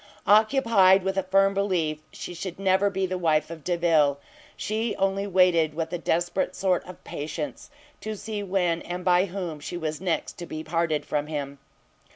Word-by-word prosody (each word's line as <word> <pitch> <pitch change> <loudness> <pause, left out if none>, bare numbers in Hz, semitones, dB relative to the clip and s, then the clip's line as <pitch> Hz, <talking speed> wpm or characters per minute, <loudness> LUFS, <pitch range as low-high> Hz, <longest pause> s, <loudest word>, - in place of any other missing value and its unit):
Occupied 210 -3 +5
with 190 0 -1
a 195 - +2
firm 195 +1 +3
belief 180 -6 0
she - - -7
should 175 0 -6
never 195 +1 +2
be 190 -1 -1
the 185 0 -3
wife 160 -2 +1
of 160 -3 -9
Delvile, 165 -5 +2 0.4
she 220 +1 -2
only 195 +1 0
waited, 175 -5 +3
with 165 +1 -3
a 175 - -2
desperate 175 +3 0
sort 185 -2 +1
of 180 - -11
patience, 150 +1 -5 0.3
to 215 0 -5
see 215 0 -5
when 180 -4 0
and 180 +1 -6
by 180 +1 +4
whom 175 -5 -5
she 175 +4 -6
was 155 -1 -4
next 175 -2 -2
to 175 - -6
be 155 0 -6
parted 165 -1 -1
from 150 0 -2
him. 140 -2 -5
180 Hz, 180 wpm, -26 LUFS, 160-195 Hz, 0.4 s, Occupied